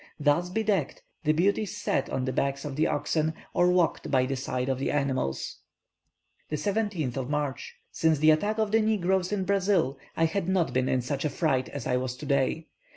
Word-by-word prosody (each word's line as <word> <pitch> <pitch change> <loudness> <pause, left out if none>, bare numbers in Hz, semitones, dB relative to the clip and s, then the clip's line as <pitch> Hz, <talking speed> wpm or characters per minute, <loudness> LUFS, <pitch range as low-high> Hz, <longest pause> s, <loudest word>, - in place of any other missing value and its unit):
Thus 150 +4 +2
bedecked, 200 -6 -1 0.2
the 155 - +4
beauties 195 +5 +1
sat 135 - -1
on 130 - -1
the 130 - -2
backs 140 +2 -1
of 145 -2 -4
the 155 +2 +2
oxen, 155 +1 0 0.2
or 175 0 +4
walked 180 -2 +1
by 130 -2 +3
the 135 +1 -2
side 130 -1 -2
of 135 -1 -1
the 135 - -1
animals. 135 - -1 0.9
17th 155 - -1
March. 145 -2 -3 0.2
Since 160 -1 +2
the 155 +2 +5
attack 205 +8 +1
of 215 -2 0
the 225 +1 +4
negroes 190 -3 +1
in 195 -3 -1
Brazil, 190 -8 +1 0.2
I 165 - +4
had 180 +2 -1
not 175 -8 +1
been 130 +1 +1
in 130 -1 +1
such 135 +2 -2
a 150 - +1
fright 135 -5 0
as 140 -5 -6
I 125 - +1
was 125 0 -3
today. 140 +2 0
155 Hz, 190 wpm, -27 LUFS, 135-185 Hz, 0.9 s, the